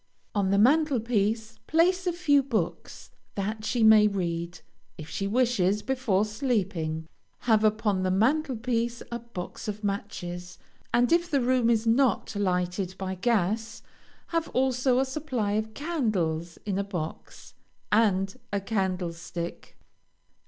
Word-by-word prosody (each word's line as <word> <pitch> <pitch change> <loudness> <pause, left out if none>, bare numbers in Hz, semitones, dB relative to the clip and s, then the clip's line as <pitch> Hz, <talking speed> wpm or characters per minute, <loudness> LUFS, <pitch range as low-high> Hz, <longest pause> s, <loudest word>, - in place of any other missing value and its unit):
On 200 -2 +1
the 200 - +3
mantel 280 +4 +4
piece, 220 0 -1
place 360 +3 +3
a - - +3
few 315 -5 +3
books 225 -11 -3 0.2
that 215 +2 -3
she 235 +1 0
may 215 -1 +7
read, 170 -3 -3 0.4
if 155 - -8
she 195 - -2
wishes, 210 -4 +2
before 245 -7 +1
sleeping. 195 - -2 0.3
Have 220 -2 +3
upon 215 -2 +2
the 185 - +1
mantel 260 +9 +2
piece 235 0 -1
a 235 - -3
box 230 -2 -8
of 210 0 -5
matches, 180 -3 -4 0.3
and 240 +3 +3
if 345 +1 +3
the 280 - +2
room 250 -1 +2
is 230 -1 +2
not 235 0 +2
lighted 185 -1 -1
by 190 -1 -3
gas, 220 +2 0 0.5
have 330 -1 0
also 255 0 +2
a 265 - +3
supply 260 -6 -2
of 215 +1 -2
candles 195 - -1
in 200 -2 -1
a - - +1
box, 175 -5 -7 0.4
and 195 -3 +2
a 200 - 0
candlestick. 180 -4 -4
215 Hz, 140 wpm, -27 LUFS, 190-245 Hz, 0.5 s, may